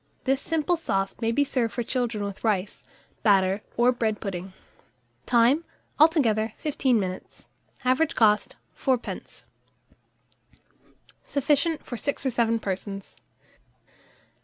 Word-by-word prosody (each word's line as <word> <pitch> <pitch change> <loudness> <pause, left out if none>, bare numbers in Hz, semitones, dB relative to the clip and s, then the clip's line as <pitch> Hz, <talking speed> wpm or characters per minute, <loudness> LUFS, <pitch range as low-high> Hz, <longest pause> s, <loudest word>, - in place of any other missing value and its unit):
This 270 +1 +1
simple 325 +2 0
sauce 195 -11 -1
may 225 0 +1
be 285 +5 +3
served 240 -5 -1
for 240 - -2
children 235 -4 -1
with 200 -1 -6
rice, 205 -3 -1 0.4
batter, 195 -1 +3 0.2
or 240 +1 +5
bread 225 -4 -1
pudding. 185 -2 -5 0.7
Time. 245 +6 +4 0.4
Altogether, 230 -9 +4
15 265 -5 +1
minutes. 185 -2 -6 0.4
Average 290 +6 +2
cost, 210 -2 +3 0.2
4d. 255 -3 -3 1.8
Sufficient 295 +3 +1
for 240 - -5
6 285 +3 -3
or 265 - +2
7 230 -1 +2
persons. 195 -1 -5
235 Hz, 110 wpm, -26 LUFS, 205-275 Hz, 1.8 s, or